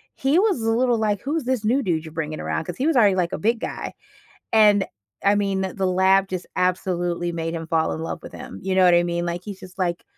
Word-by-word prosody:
he 275 Hz, +4 st, +2 dB
was 395 Hz, -, +2 dB
a 225 Hz, 0 st, +1 dB
little, 240 Hz, 0 st, +2 dB
like, 205 Hz, -2 st, 0 dB
"Who's 300 Hz, +3 st, -2 dB
this 255 Hz, -4 st, -1 dB
new 255 Hz, +6 st, +2 dB
dude 165 Hz, -4 st, -1 dB
you're 160 Hz, -, -10 dB
bringing 155 Hz, -1 st, -4 dB
around?" -, -, -2 dB
'Cause 175 Hz, -, -6 dB
he 270 Hz, -, 0 dB
was 325 Hz, -, +2 dB
already, 205 Hz, -5 st, +5 dB
like, 180 Hz, -1 st, 0 dB
a -, -, -1 dB
big 225 Hz, +2 st, +1 dB
guy. -, -, -5 dB, 0.6 s
And, 210 Hz, -3 st, +5 dB, 0.4 s
I 200 Hz, +1 st, +5 dB
mean, 195 Hz, -1 st, 0 dB, 0.2 s
the 195 Hz, -1 st, 0 dB
lab 190 Hz, +1 st, +3 dB
just 185 Hz, -1 st, -4 dB
absolutely 175 Hz, -1 st, 0 dB
made 165 Hz, 0 st, -3 dB
him 165 Hz, -1 st, -5 dB
fall 160 Hz, -1 st, +1 dB
in -, -, -4 dB
love -, -, -5 dB
with -, -, -10 dB
him. -, -, -9 dB
You 190 Hz, 0 st, -1 dB
know 190 Hz, -1 st, +5 dB
what 180 Hz, -, +6 dB
I 175 Hz, -, +5 dB
mean? 170 Hz, 0 st, -1 dB
Like, 175 Hz, +1 st, -3 dB
he's 200 Hz, -2 st, -8 dB
just, 185 Hz, 0 st, -13 dB
like, 175 Hz, -2 st, -1 dB
190 Hz, 255 wpm, -23 LUFS, 175-215 Hz, 0.6 s, what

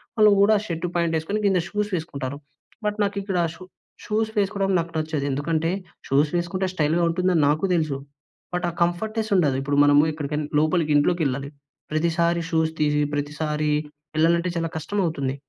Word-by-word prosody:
వాళ్ళు 215 Hz, -2 st, +6 dB
కూడా 205 Hz, +2 st, +5 dB
shirt 165 Hz, -2 st, -3 dB
pant 170 Hz, -1 st, +1 dB
ఏసుకొని 180 Hz, +7 st, -2 dB
కింద 190 Hz, -2 st, +3 dB
షూస్ 210 Hz, 0 st, -2 dB
వేసుకుంటారు. 140 Hz, -5 st, -4 dB, 0.5 s
బట్ 210 Hz, 0 st, -1 dB
నాకు 200 Hz, 0 st, -1 dB
ఇక్కడ 195 Hz, -2 st, -2 dB, 0.2 s
షు 185 Hz, -, -12 dB, 0.4 s
షూస్ 220 Hz, +1 st, 0 dB
వేసుకోవడం 195 Hz, -1 st, +1 dB
నాకు 165 Hz, 0 st, -4 dB
నచ్చదు 155 Hz, -2 st, -2 dB
ఎందుకంటే 160 Hz, +4 st, 0 dB, 0.4 s
షూస్ 145 Hz, +2 st, +3 dB
వేసుకుంటే 185 Hz, +2 st, -1 dB
స్టైల్‌గా 165 Hz, 0 st, +1 dB
ఉంటుందని 180 Hz, -1 st, +2 dB
నాకు 155 Hz, +5 st, +1 dB
తెలుసు. 155 Hz, -5 st, 0 dB, 0.6 s
బట్ 180 Hz, -, -1 dB
ఆ -, -, -4 dB
కంఫర్ట్‌నెస్ 215 Hz, +6 st, -2 dB
ఉండదు. 145 Hz, -7 st, +2 dB
ఇప్పుడు 140 Hz, +1 st, -1 dB
మనము 145 Hz, 0 st, +6 dB
ఎక్కడికనా 150 Hz, 0 st, -3 dB
లోపలికి 155 Hz, 0 st, +2 dB
ఇంట్లోకెళ్ళాలి 145 Hz, -4 st, 0 dB, 0.4 s
ప్రతిసారి 170 Hz, +2 st, +1 dB
షూస్ 160 Hz, -1 st, +2 dB
తీసి 150 Hz, -1 st, +2 dB
ప్రతిసారి 150 Hz, +1 st, -2 dB, 0.5 s
వెళ్ళాలంటే 170 Hz, +3 st, +3 dB
చాలా 165 Hz, -1 st, -1 dB
కష్టం 200 Hz, +6 st, -3 dB
అవుతుంది. 140 Hz, -5 st, -2 dB
165 Hz, 155 wpm, -24 LUFS, 150-180 Hz, 0.6 s, వాళ్ళు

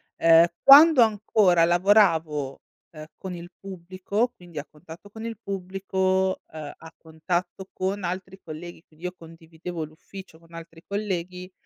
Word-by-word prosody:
Ehm, 165 Hz, 0 st, +6 dB, 0.2 s
quando 285 Hz, 0 st, +9 dB
ancora 205 Hz, -5 st, +3 dB
lavoravo, 170 Hz, -7 st, +2 dB, 0.3 s
ehm, 155 Hz, -1 st, -10 dB
con 185 Hz, -2 st, -7 dB
il 175 Hz, 0 st, -10 dB
pubblico, 190 Hz, +5 st, -3 dB
quindi 175 Hz, -8 st, -11 dB
a 145 Hz, -, -7 dB
contatto 165 Hz, +5 st, -14 dB
con 220 Hz, +2 st, -9 dB
il 230 Hz, -1 st, -5 dB
pubblico, 190 Hz, 0 st, -1 dB
ehm, 155 Hz, -2 st, -8 dB
a 160 Hz, 0 st, -14 dB
contatto 175 Hz, +4 st, -4 dB
con 190 Hz, +1 st, -3 dB
altri 185 Hz, +2 st, -6 dB
colleghi, 165 Hz, +1 st, -10 dB
quindi 160 Hz, +2 st, -22 dB
io 180 Hz, -, -3 dB
condividevo 165 Hz, +1 st, -9 dB
l'ufficio 160 Hz, +3 st, -12 dB
con 165 Hz, 0 st, -22 dB
altri 165 Hz, 0 st, -11 dB
colleghi, 185 Hz, -3 st, -4 dB
180 Hz, 140 wpm, -24 LUFS, 165-195 Hz, 0.3 s, quando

